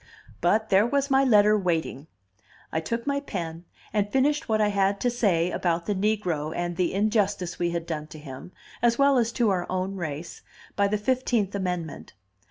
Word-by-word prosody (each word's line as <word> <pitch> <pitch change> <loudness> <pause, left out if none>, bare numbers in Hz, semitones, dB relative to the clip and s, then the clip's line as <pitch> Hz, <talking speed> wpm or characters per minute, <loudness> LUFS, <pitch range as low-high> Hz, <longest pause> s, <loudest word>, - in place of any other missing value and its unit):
But 215 +6 +2
there 200 +3 +4
was 280 +2 0
my 270 0 +5
letter 210 -4 +5
waiting. 165 -7 -1 0.6
I 160 - 0
took 230 +9 -3
my 280 0 0
pen, 170 - -6 0.3
and 205 -1 0
finished 290 +2 +1
what 215 -1 +2
I 210 -1 +3
had 200 0 +1
to 245 - +2
say 180 -8 +1
about 170 -1 -1
the 205 - 0
negro 185 -7 -1
and 175 0 -2
the 180 0 0
injustice 205 -3 0
we 175 - +1
had 170 -1 -3
done 155 -2 -4
to 155 - -11
him, 145 +2 -10 0.3
as 235 -1 +3
well 275 -2 +4
as 230 -1 +1
to 235 -5 +2
our 180 -2 -1
own 185 +1 -2
race, 165 -1 -6 0.3
by 200 0 +3
the 210 +1 0
Fifteenth 235 -3 0
Amendment. 180 -5 -4
200 Hz, 185 wpm, -26 LUFS, 175-225 Hz, 0.6 s, my